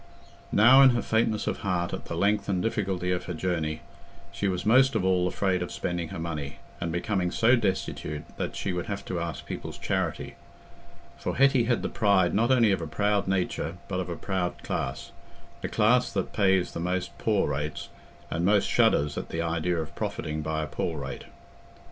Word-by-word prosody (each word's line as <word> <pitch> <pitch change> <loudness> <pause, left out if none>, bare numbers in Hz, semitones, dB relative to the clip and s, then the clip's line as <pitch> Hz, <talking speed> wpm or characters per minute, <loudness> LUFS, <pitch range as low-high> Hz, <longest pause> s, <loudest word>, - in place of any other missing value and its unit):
Now 130 +6 +7
in 135 - +9
her 120 - +1
faintness 110 -1 +1
of - - -2
heart 90 -3 -1
at - - -5
the 85 - -5
length 100 +3 +1
and 95 -2 +1
difficulty 95 -4 -1
of 90 - -1
her 90 - -4
journey, 80 -3 -2 0.5
she 100 - -2
was 90 -2 -2
most 130 +5 +5
of 95 - +1
all 90 -1 +3
afraid 95 0 0
of 90 - -4
spending 85 -1 -3
her 95 - -7
money, 75 -4 -4 0.2
and 85 -1 -2
becoming 90 +1 0
so 115 +6 +4
destitute 95 -8 -2
that - - -3
she 95 - -2
would 90 -1 -3
have 100 - -4
to 90 - -3
ask 85 -1 -5
people's - - -6
charity; - - -2 0.9
for - - -3
Hetty 135 -2 +4
had 120 -1 +1
the - - 0
pride 100 -5 +2
not 115 +4 +2
only 120 -5 +5
of 95 - 0
a 80 - -4
proud 105 +4 0
nature 90 -3 -1
but 95 -2 -2
of 90 -1 -3
a 85 - -3
proud 95 0 -3
class—the - - -6
class 120 +3 +3
that 95 -3 -2
pays 95 -3 +2
the - - -5
most 90 +1 -2
poor 105 -8 +1
rates, 75 +4 -4 0.4
and 85 - -1
most 100 +2 +3
shudders 70 0 +2
at - - -7
the 80 +1 -2
idea 85 +1 0
of 80 -2 -4
profiting 75 0 -3
by 80 0 -2
a - - -4
poor 80 +3 -3
rate. 70 -1 -6
90 Hz, 195 wpm, -27 LUFS, 85-105 Hz, 0.9 s, in